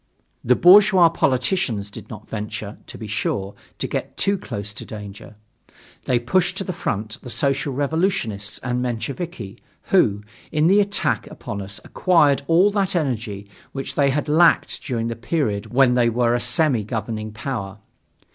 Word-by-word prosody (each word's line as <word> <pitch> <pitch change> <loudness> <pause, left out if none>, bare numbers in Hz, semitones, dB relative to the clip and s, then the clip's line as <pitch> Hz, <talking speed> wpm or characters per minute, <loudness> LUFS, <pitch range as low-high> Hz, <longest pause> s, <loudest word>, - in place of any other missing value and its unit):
The 125 - +4
bourgeois 190 0 +7
politicians 130 - 0
did - - -11
not 110 -1 -10
venture, 105 -1 -6
to - - -9
be 110 - -7
sure, 100 -2 -2 0.2
to - - -3
get - - -4
too 200 - +2
close 105 - -6
to - - -8
danger. 105 +1 -10 0.7
They 125 - +2
pushed 170 +10 0
to - - -2
the 185 - -4
front 110 -3 -4
the 125 - -9
Social 140 +2 0
Revolutionists 140 - -1
and 125 0 -1
Mensheviki, 125 - -5 0.3
who, 105 +1 +3 0.3
in 155 0 +2
the 195 +5 +5
attack 200 0 -1
upon 100 -1 -7
us 100 +1 -6
acquired 155 -7 +3
all 180 +5 +4
that 200 -2 0
energy 115 - -2 0.3
which 135 0 -4
they 140 -1 +2
had 145 +2 -1
lacked 165 +3 +3
during 115 -4 -2
the 115 - -3
period 115 -4 -2
when 130 0 +4
they 120 -1 +3
were 120 0 +1
a 120 - +1
semi 125 +1 +2
governing 110 0 -4
power. 105 -4 -5
125 Hz, 160 wpm, -22 LUFS, 105-160 Hz, 0.7 s, bourgeois